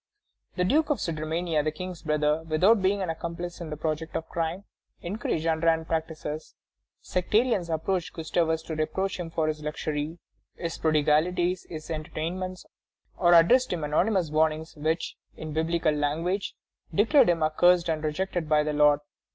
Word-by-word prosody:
The 180 - +1
Duke 300 +10 +2
of 295 - +2
Sudermania, 160 0 -1
the 155 - +1
King's 180 +2 -7
brother, 150 0 +1
without 190 +8 +4
being 195 +1 +1
an 175 - -1
accomplice 170 +2 -6
in 165 - -5
the 150 - -5
project 160 +1 -3
of 160 - -3
crime, 170 +3 -3 0.4
encouraged 175 -3 -2
underhand 160 0 +2
practices. 160 -1 -4 0.5
Sectarians 200 0 +1
approached 165 +2 -1
Gustavus 160 0 0
to 160 - -5
reproach 190 +5 -2
him 170 -2 -4
for 160 -1 -1
his 155 0 -2
luxury, 150 +1 -3 0.4
his 165 -1 -5
prodigalities, 160 +4 +2
his 155 0 -7
entertainments, 170 +4 -4 0.5
or 175 -1 +5
addressed 250 +10 +5
him 170 -4 -2
anonymous 175 +3 +1
warnings 155 +1 0
which, 160 +2 -2 0.2
in 155 -1 -6
Biblical 160 0 +1
language, 165 +7 -1 0.4
declared 220 - +5
him 165 -2 +2
accursed 175 +3 +4
and 160 -1 -1
rejected 160 +1 -2
by 150 -1 +4
the 150 0 -2
Lord. 150 0 +4
165 Hz, 150 wpm, -27 LUFS, 155-180 Hz, 0.5 s, or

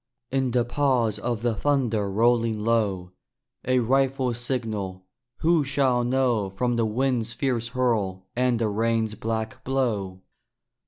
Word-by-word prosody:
In 135 -1 +1
the 120 -1 +1
pause 120 -5 +1
of 120 -1 -3
the 120 -1 +2
thunder 115 -4 0
rolling 115 +2 +2
low, 100 -6 0 0.5
A 130 +1 +2
rifle's 130 -1 +1
signal 110 -7 -3 0.4
who 165 -1 +3
shall 135 -3 +1
know 120 -5 +1
From 120 +6 -1
the 115 -1 +1
wind's 115 0 0
fierce 120 -3 -1
hurl 110 -7 -1
and 125 -1 +2
the 115 -1 0
rain's 110 +1 0
black 110 +3 -4
blow? 105 -9 -1
120 Hz, 130 wpm, -25 LUFS, 110-130 Hz, 0.5 s, who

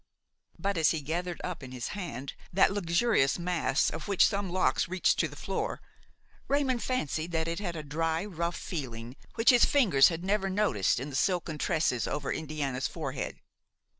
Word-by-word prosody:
But 200 -2 -1
as 160 -2 +4
he 160 - -1
gathered 175 +4 -3
up 180 -3 -4
in 130 -2 -9
his 125 -2 -4
hand 140 - -5 0.2
that 190 +2 +4
luxuriant 175 - +2
mass 175 -5 +1
of 160 -1 -6
which 200 -2 +5
some 200 -2 -1
locks 170 -5 +1
reached 185 +1 +1
to - - +3
the - - -12
floor, - - -3 0.7
Raymon 270 -3 +1
fancied 170 - -2
that 160 0 0
it 170 +2 -2
had 175 -4 -3
a 155 - -5
dry, 160 +4 -1
rough 170 -3 -3
feeling 125 -7 -6 0.2
which 225 +2 +6
his 245 -2 +5
fingers 200 - +5
had 170 +1 -5
never 195 0 +1
noticed 190 - +1
in 140 +3 -5
the - - -6
silken 160 +3 0
tresses 130 -8 +1
over 140 - -2
Indiana's 145 -4 -2
forehead. 140 -5 -5
165 Hz, 175 wpm, -29 LUFS, 140-195 Hz, 0.7 s, which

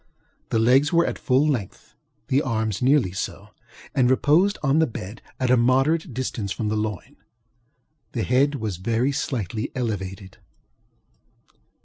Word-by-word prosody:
The - - 0
legs 130 +6 +4
were 170 0 +4
at - - -3
full 135 +3 +2
length; 120 -11 -4 0.3
the 135 +2 +2
arms 110 -6 -2
were - - +1
nearly 135 -9 +3
so, 100 - -5 0.4
and 125 -2 +3
reposed 160 +10 +3
on 140 +2 +3
the 160 - +3
bed 105 -2 -8 0.2
at 130 -1 +1
a 125 - +5
moderate 135 +7 +2
distance 120 -5 -4
from 105 +1 -2
the 110 - -1
loin. 105 -2 -4 1.0
The 115 - -1
head 140 +4 +2
was 110 -8 -4
very 115 +8 0
slightly 115 -6 -3
elevated. 95 -6 -4
125 Hz, 145 wpm, -23 LUFS, 110-140 Hz, 1.0 s, a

